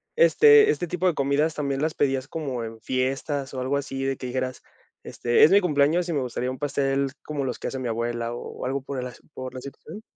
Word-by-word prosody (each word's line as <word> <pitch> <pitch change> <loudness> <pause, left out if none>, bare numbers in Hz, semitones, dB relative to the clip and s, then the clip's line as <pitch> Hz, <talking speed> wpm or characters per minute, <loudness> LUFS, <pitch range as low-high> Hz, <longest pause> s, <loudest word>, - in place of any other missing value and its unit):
¿este 440 -2 +7
este 175 - -2
tipo 180 +2 0
de 180 - +3
comidas 145 +2 +1
también 140 -2 -2
las 155 +1 0
pedías 135 -2 0
como 135 -7 -4
en 115 0 -7
fiestas 135 +3 -2
o 130 - -4
algo 135 +2 0
así, 135 -1 -4
de 135 -1 -1
que 130 - -6
dijeras, 130 0 -3 0.4
este: 120 0 +2
"Es 155 - +7
mi 200 - +7
cumpleaños 165 +1 +2
y - - 0
me 145 - 0
gustaría 125 0 -3
un 130 - -6
pastel 140 -1 0
como 150 -2 -3
los 125 -3 -3
que - - -4
hace 130 - -4
mi 125 - -3
abuela", 115 +1 -2
o 120 - -7
algo 135 +2 -1
¿por 130 0 -5
las, 125 -1 -8
por 130 0 -7
la 130 - -7
situación? 140 +9 -10
135 Hz, 230 wpm, -25 LUFS, 130-150 Hz, 0.4 s, este